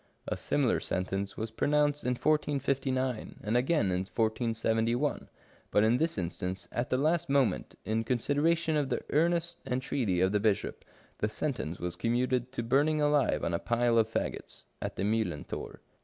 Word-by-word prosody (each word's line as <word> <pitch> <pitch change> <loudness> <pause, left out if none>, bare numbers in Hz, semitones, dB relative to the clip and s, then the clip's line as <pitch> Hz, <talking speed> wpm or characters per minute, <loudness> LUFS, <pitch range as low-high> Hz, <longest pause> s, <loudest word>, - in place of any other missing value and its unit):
A - - -1
similar - - +1
sentence 95 +2 -2
was 110 0 -3
pronounced 145 +4 +1
in 125 0 +1
1459, 135 -4 0
and 110 +2 -1
again 125 - +2
in 90 - +1
1471, 115 +5 0 0.4
but 105 - +3
in 115 +3 +4
this 160 -1 0
instance, 90 0 -3
at 120 +2 -2
the 130 - +2
last 155 +3 +1
moment, 135 -3 +1
in 110 +1 0
con 125 +2 +1
sideration 160 +5 +1
of 145 -3 +1
the - - -1
earnest 170 +2 +1
entreaty 125 -7 0
of 95 +1 +3
the 105 - +2
bishop, 105 -2 0 0.4
the 105 - 0
sentence 115 - -3
was 90 0 -3
commuted 125 +4 0
to 125 -3 -3
burning 145 +6 +2
alive 145 -2 +2
on - - 0
a 85 - +1
pile 120 -1 +2
of 110 0 +1
faggots, - - -4 0.2
at - - -4
the - - -2
Mijhlenthor. 105 -7 -2
120 Hz, 165 wpm, -30 LUFS, 110-145 Hz, 0.4 s, in